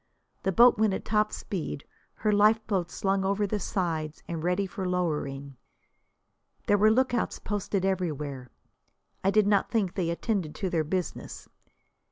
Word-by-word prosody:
The 190 Hz, -, 0 dB
boat 235 Hz, +3 st, +6 dB
went 215 Hz, -3 st, +3 dB
at -, -, -6 dB
top 215 Hz, 0 st, +1 dB
speed, 165 Hz, -6 st, -5 dB, 0.3 s
her 215 Hz, -, 0 dB
lifeboats 210 Hz, -4 st, +2 dB
slung 195 Hz, 0 st, 0 dB
over 200 Hz, +2 st, +1 dB
the 205 Hz, +1 st, -2 dB
sides 160 Hz, -5 st, -2 dB
and 165 Hz, -2 st, -4 dB
ready 180 Hz, +3 st, +1 dB
for 190 Hz, -1 st, -4 dB
lowering. 140 Hz, -6 st, -2 dB, 1.1 s
There 205 Hz, 0 st, +3 dB
were 215 Hz, +2 st, +6 dB
lookouts 245 Hz, +1 st, +1 dB
posted 200 Hz, -2 st, -2 dB
everywhere. 150 Hz, -9 st, -2 dB, 0.7 s
I 190 Hz, -, +3 dB
did 215 Hz, +1 st, +4 dB
not 205 Hz, -1 st, +2 dB
think 205 Hz, -6 st, 0 dB
they 175 Hz, -4 st, -1 dB
attended 170 Hz, -2 st, -2 dB
to 190 Hz, -4 st, -3 dB
their 160 Hz, -2 st, +1 dB
business. 180 Hz, +2 st, -4 dB
190 Hz, 150 wpm, -28 LUFS, 170-210 Hz, 1.1 s, boat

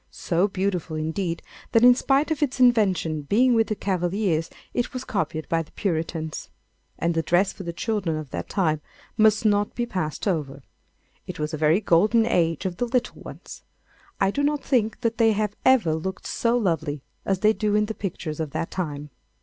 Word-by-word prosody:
so 175 Hz, +3 st, 0 dB
beautiful 185 Hz, -5 st, -2 dB
indeed, 165 Hz, +2 st, -2 dB, 0.3 s
that 230 Hz, -, +5 dB
in 250 Hz, 0 st, +9 dB
spite 275 Hz, +5 st, +1 dB
of 310 Hz, -, -1 dB
its 275 Hz, -2 st, 0 dB
invention 195 Hz, -11 st, +3 dB
being 240 Hz, -, +3 dB
with 225 Hz, -1 st, +3 dB
the 215 Hz, -, -1 dB
Cavaliers 180 Hz, -3 st, -1 dB, 0.2 s
it 245 Hz, -, -1 dB
was 255 Hz, 0 st, -4 dB
copied 160 Hz, -6 st, -2 dB
by 165 Hz, 0 st, +1 dB
the 155 Hz, -, -11 dB
Puritans. 160 Hz, -4 st, -3 dB, 0.5 s
And 170 Hz, 0 st, 0 dB
the 165 Hz, -, +1 dB
dress 175 Hz, +4 st, +2 dB
for -, -, -10 dB
the 170 Hz, -2 st, -4 dB
children 185 Hz, -3 st, -2 dB
of 155 Hz, -4 st, -7 dB
that 85 Hz, 0 st, -5 dB
time 155 Hz, -6 st, 0 dB, 0.3 s
must 220 Hz, +1 st, +4 dB
not 205 Hz, -1 st, +2 dB
be 240 Hz, -, -1 dB
passed 185 Hz, -6 st, -3 dB
over. 145 Hz, -7 st, -2 dB, 0.6 s
It -, -, -6 dB
was 150 Hz, +1 st, -3 dB
a -, -, -2 dB
very 160 Hz, +6 st, +4 dB
golden 215 Hz, +5 st, +4 dB
age 165 Hz, -8 st, +1 dB
of 180 Hz, -2 st, -3 dB
the 245 Hz, -, -1 dB
little 245 Hz, 0 st, -1 dB
ones. -, -, -10 dB, 0.6 s
I 195 Hz, 0 st, +3 dB
do 285 Hz, -, -1 dB
not 290 Hz, 0 st, 0 dB
think 225 Hz, -5 st, 0 dB
that 230 Hz, 0 st, -1 dB
they 225 Hz, -1 st, +5 dB
have 210 Hz, 0 st, -1 dB
ever 245 Hz, -12 st, +4 dB
looked 185 Hz, +4 st, -4 dB
so 235 Hz, +1 st, +1 dB
lovely 160 Hz, -, -1 dB, 0.2 s
as 195 Hz, -1 st, -1 dB
they 215 Hz, +1 st, +5 dB
do 210 Hz, -1 st, 0 dB
in 210 Hz, 0 st, +3 dB
the 220 Hz, -, -4 dB
pictures 170 Hz, -7 st, -5 dB
of 160 Hz, -2 st, -2 dB
that -, -, -3 dB
time. 150 Hz, -5 st, -4 dB
190 Hz, 195 wpm, -24 LUFS, 160-225 Hz, 0.6 s, in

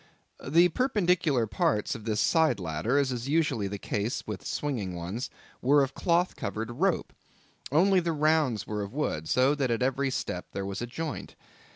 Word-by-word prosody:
The 170 Hz, +6 st, +5 dB
perpendicular 180 Hz, -, +2 dB
parts 105 Hz, 0 st, 0 dB
of 110 Hz, -2 st, -8 dB
this 110 Hz, -2 st, 0 dB
side 160 Hz, -, +3 dB
ladder, 90 Hz, -, -1 dB
as 140 Hz, -2 st, +2 dB
is 125 Hz, +1 st, -4 dB
usually 145 Hz, -, +1 dB
the 100 Hz, +1 st, -4 dB
case 105 Hz, +4 st, -2 dB
with 100 Hz, -7 st, -6 dB
swinging 105 Hz, -, -3 dB
ones, 90 Hz, +9 st, -4 dB, 0.3 s
were 140 Hz, +3 st, +5 dB
of 135 Hz, 0 st, -3 dB
cloth 175 Hz, +3 st, +1 dB
covered 110 Hz, +2 st, -4 dB
rope, 175 Hz, +9 st, 0 dB, 0.6 s
only 185 Hz, +6 st, +4 dB
the 170 Hz, -1 st, -1 dB
rounds 155 Hz, -6 st, +2 dB
were 105 Hz, -1 st, -3 dB
of 100 Hz, +2 st, -6 dB
wood, 80 Hz, -, -2 dB
so 130 Hz, +3 st, +4 dB
that 140 Hz, -4 st, 0 dB
at 115 Hz, +1 st, 0 dB
every 135 Hz, +1 st, +1 dB
step 90 Hz, -8 st, -3 dB
there 100 Hz, -, -3 dB
was 100 Hz, +2 st, -4 dB
a 120 Hz, -, -3 dB
joint. 155 Hz, +5 st, -5 dB
130 Hz, 180 wpm, -28 LUFS, 105-155 Hz, 0.6 s, The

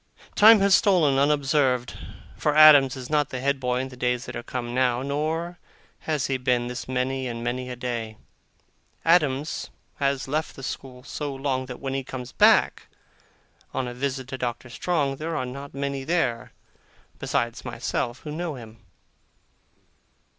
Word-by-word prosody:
Time 215 Hz, 0 st, +8 dB
has 200 Hz, 0 st, +4 dB
stolen 180 Hz, -9 st, +4 dB
on 140 Hz, +1 st, +4 dB
unobserved, 135 Hz, -4 st, +1 dB, 0.4 s
for 150 Hz, -1 st, 0 dB
Adams 150 Hz, -4 st, +8 dB
is 130 Hz, -2 st, -7 dB
not 150 Hz, -1 st, +1 dB
the 130 Hz, -, -5 dB
head 140 Hz, +1 st, 0 dB
boy 125 Hz, -1 st, 0 dB
in 130 Hz, +1 st, -3 dB
the 130 Hz, -, -11 dB
days 125 Hz, 0 st, -1 dB
that -, -, -7 dB
are -, -, -4 dB
come 120 Hz, 0 st, -5 dB
now, 125 Hz, -1 st, +1 dB
nor 160 Hz, +5 st, -2 dB, 0.4 s
has 150 Hz, -4 st, -1 dB
he 135 Hz, -, 0 dB
been 125 Hz, -1 st, +1 dB
this 125 Hz, +1 st, -6 dB
many 130 Hz, +1 st, -1 dB
and 115 Hz, -1 st, -5 dB
many 125 Hz, +1 st, -3 dB
a 125 Hz, -, -5 dB
day. 120 Hz, -3 st, -4 dB, 0.9 s
Adams 155 Hz, -3 st, +2 dB, 0.3 s
has 140 Hz, -1 st, 0 dB
left 155 Hz, +4 st, -2 dB
the 135 Hz, -, -10 dB
school 130 Hz, -1 st, -7 dB
so 145 Hz, 0 st, -5 dB
long, 135 Hz, -1 st, -2 dB
that 125 Hz, -, -8 dB
when 135 Hz, -1 st, -4 dB
he 135 Hz, 0 st, -2 dB
comes 125 Hz, -1 st, -7 dB
back, -, -, +4 dB, 0.9 s
on 130 Hz, -1 st, -1 dB
a 120 Hz, -, -5 dB
visit 130 Hz, 0 st, -3 dB
to 130 Hz, -, -6 dB
Doctor 120 Hz, 0 st, -4 dB
Strong, 140 Hz, -2 st, -1 dB
there 160 Hz, +2 st, -4 dB
are 130 Hz, -, -1 dB
not 140 Hz, +2 st, -8 dB
many 140 Hz, -1 st, -3 dB
there, 135 Hz, -7 st, -1 dB, 0.7 s
besides 120 Hz, -1 st, -2 dB
myself, 120 Hz, +2 st, -3 dB
who 150 Hz, -, -7 dB
know 165 Hz, 0 st, -4 dB
him. 115 Hz, -2 st, -12 dB
135 Hz, 170 wpm, -25 LUFS, 125-150 Hz, 0.9 s, Time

